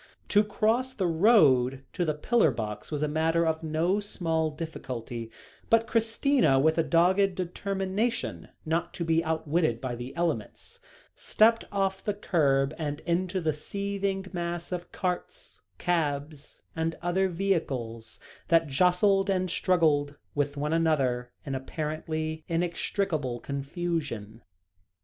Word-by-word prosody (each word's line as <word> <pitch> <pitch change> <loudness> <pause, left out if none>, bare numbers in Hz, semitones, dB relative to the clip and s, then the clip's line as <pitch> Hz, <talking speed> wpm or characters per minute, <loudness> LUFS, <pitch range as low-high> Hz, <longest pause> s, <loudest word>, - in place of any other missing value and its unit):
To 205 +1 +5
cross 225 +5 0
the 190 - 0
road 150 - +4
to 180 - 0
the 155 -2 0
pillar 225 +4 +3
box 105 -4 -5
was 150 -1 -2
a - - +2
matter 160 +2 +1
of 160 -1 0
no 165 +5 +1
small 165 -6 -1
difficulty, 125 -7 -6 0.4
but 230 0 +4
Christina, 230 - +2
with 160 +4 +3
a - - +4
dogged 180 +5 +3
determination 195 +5 -2 0.2
not 160 +2 -1
to 170 - -3
be 165 0 +2
outwitted 160 -5 0
by 125 0 -3
the 120 +2 -7
elements, 165 -11 -3 0.4
stepped 225 +1 +3
off 195 -1 -1
the 210 - -1
kerb 140 -8 +2
and 145 -1 -3
into 185 +2 0
the 160 -3 0
seething 200 +4 -3
mass 170 0 -3
of 175 -1 -5
carts, 180 -1 -4 0.2
cabs, 150 -4 -2
and 160 0 -1
other 190 +2 +1
vehicles, 135 - -2 0.3
that 165 -1 +4
jostled 180 +6 +3
and 185 -2 0
struggled 155 -7 +2 0.2
with 145 0 -1
one 150 +2 -1
another 135 -7 +1
in 140 - -3
apparently 155 +3 -3
inextricable 165 -5 -1
confusion. 140 - -4
165 Hz, 130 wpm, -28 LUFS, 145-190 Hz, 0.4 s, To